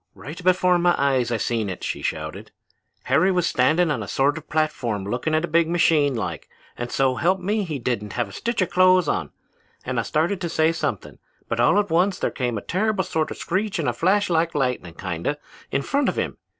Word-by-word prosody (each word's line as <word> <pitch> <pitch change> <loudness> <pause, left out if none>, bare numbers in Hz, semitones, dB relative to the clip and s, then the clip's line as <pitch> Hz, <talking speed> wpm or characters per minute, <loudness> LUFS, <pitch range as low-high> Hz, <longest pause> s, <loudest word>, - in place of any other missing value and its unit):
"'Right 160 +6 -9
before 180 0 +3
my 175 0 +3
eyes, 130 -4 +1
I 115 - +1
seen 110 -1 -1
it,' 90 - -6
she - - -3
shouted. - - -4 0.5
'Harry 190 +1 +3
was 180 -2 +1
standing 155 +6 +2
on 130 -6 -1
a 100 - -6
sort 140 +6 +1
of 160 -2 -9
platform 125 -10 -1
looking 125 +9 -1
at 160 +2 +1
a - - -10
big 170 -1 +2
machine 155 -5 +3
like, 85 -9 -4 0.3
and 120 0 -5
so 135 -1 +2
help 185 +3 +2
me 205 +4 -1
he 160 -6 -4
didn't 115 -5 -3
have 120 - -1
a - - -13
stitch 235 -4 -1
of - - -5
clothes 185 -2 +5
on, 80 - -1 0.6
and 125 -1 -1
I - - +2
started 165 - 0
to 170 - -2
say 160 0 +2
something, 165 - -4 0.3
but 115 - -2
all 120 +11 +4
at 205 -5 -1
once 180 +3 +2
there - - -1
came 125 -3 -2
a - - -4
terrible 205 +1 0
sort 160 -2 -1
of - - -7
screech 200 +3 -2
and 160 - -1
a 120 - +1
flash 190 - +2
like 165 -1 +1
lightnin' 125 - -1
kinda, 90 - -3 0.3
in 140 - -1
front 280 - +1
of - - -4
him. - - -2
155 Hz, 225 wpm, -23 LUFS, 120-180 Hz, 0.6 s, clothes